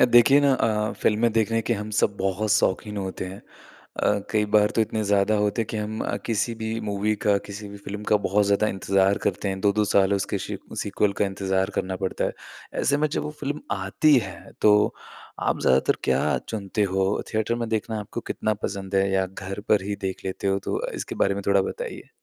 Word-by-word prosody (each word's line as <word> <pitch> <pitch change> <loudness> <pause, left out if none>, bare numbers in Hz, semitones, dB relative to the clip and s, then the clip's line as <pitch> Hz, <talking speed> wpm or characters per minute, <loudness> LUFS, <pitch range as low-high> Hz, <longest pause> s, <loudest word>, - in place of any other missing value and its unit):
अ, - - +8
देखिए 120 +3 +6
ना 140 -1 +4
अ, 110 -3 0
फ़िल्में 110 +2 +2
देखने 115 0 +2
के 110 - 0
हम 105 0 -5
सब 100 - +1
बहुत 95 +2 -1
शौकीन 105 +4 +1
होते 95 -2 -4
हैं 95 +2 -8 0.6
अ, 105 - +2
कई 105 -1 +2
बार 105 0 +5
तो - - +4
इतने 110 0 0
ज़्यादा 100 +1 +3
होते 105 +2 +1
हैं - - -7
कि - - -3
हम 110 +1 -3
अ, - - -1
किसी 115 +1 0
भी 110 0 -3
मूवी 105 +1 0
का, 100 -1 +5
किसी 100 +1 -8
भी 100 - -9
फ़िल्म 105 +1 -5
का 105 - +6
बहुत 105 +2 +3
ज़्यादा 100 +1 +3
इंतज़ार 95 +1 +2
करते 100 - 0
हैं। 95 0 -3
2-2 105 +1 +2
साल 100 0 +4
उसके 100 +1 -1
सी - - -5 0.2
सीक्वल 105 -1 +1
का - - +5
इंतज़ार 95 0 -1
करना 95 0 -2
पड़ता 95 - -1
है। - - -1 0.5
ऐसे 140 - +2
में 155 +1 +1
जब 145 - -2
वो - - -4
फ़िल्म 145 +1 -3 0.2
आती 100 +10 +3
है, 95 -6 -7
तो 105 0 +5 0.5
आप - - 0
ज़्यादातर 65 +1 +3
क्या - - +2
चुनते 105 -1 -2
हो? 95 +1 0
थिएटर 110 +1 0
में 115 -1 -3
देखना 110 0 -2
आपको 105 - -6
कितना 110 - -1
पसंद 100 -1 -4
है 95 0 +3
या 95 0 +2
घर 95 +1 -7
पर 105 -3 +4
ही 100 0 -2
देख 95 - -5
लेते 95 +1 -3
हो? 95 0 +2
तो - - -3
अ, - - -3
इसके - - -5
बारे 100 - +1
में 100 - -4
थोड़ा 100 -1 +4
बताइए। - - -6
105 Hz, 220 wpm, -25 LUFS, 95-110 Hz, 0.6 s, अ